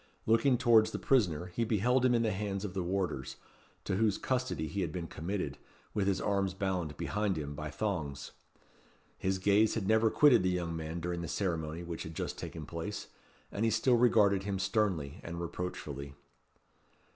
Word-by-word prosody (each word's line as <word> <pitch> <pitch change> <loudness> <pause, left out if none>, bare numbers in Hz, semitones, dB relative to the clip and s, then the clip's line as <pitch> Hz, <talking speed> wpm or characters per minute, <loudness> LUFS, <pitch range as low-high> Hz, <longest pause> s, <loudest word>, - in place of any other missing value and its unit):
Looking 120 +3 +4
towards 115 -3 +5
the - - -4
prisoner, 90 - +2
he 115 - 0
beheld 120 +4 +2
him 125 -1 +4
in 115 - +2
the 110 - +1
hands 100 0 -3
of 95 - -5
the 95 - -1
warders, 90 -7 -2 0.5
to 95 - -1
whose 105 -2 +2
custody 130 -11 -1
he 95 +7 -3
had 85 -4 -1
been 85 +1 -4
committed, 90 +5 -4 0.3
with 100 -2 0
his 95 -1 +2
arms 100 -2 0
bound 90 -6 -2
behind 105 -3 -1
him 75 -1 -4
by 75 +1 -5
thongs. 75 -7 -3 0.9
His 95 0 0
gaze 100 +3 +3
had 105 -4 -2
never 110 +1 +4
quitted 145 -1 +6
the 95 - +1
young 85 -2 -1
man 80 +1 -4
during 85 0 -2
the 85 - -4
ceremony 85 -3 -2
which 85 -1 -5
had 80 0 -7
just - - -4
taken 80 -2 -6
place, 85 +7 -5 0.4
and 100 - -2
he 115 - +4
still 115 +3 +3
regarded 110 -5 +4
him 100 0 -2
sternly 95 - 0
and 85 0 -6
reproachfully. 75 -5 -5
95 Hz, 180 wpm, -32 LUFS, 85-110 Hz, 0.9 s, quitted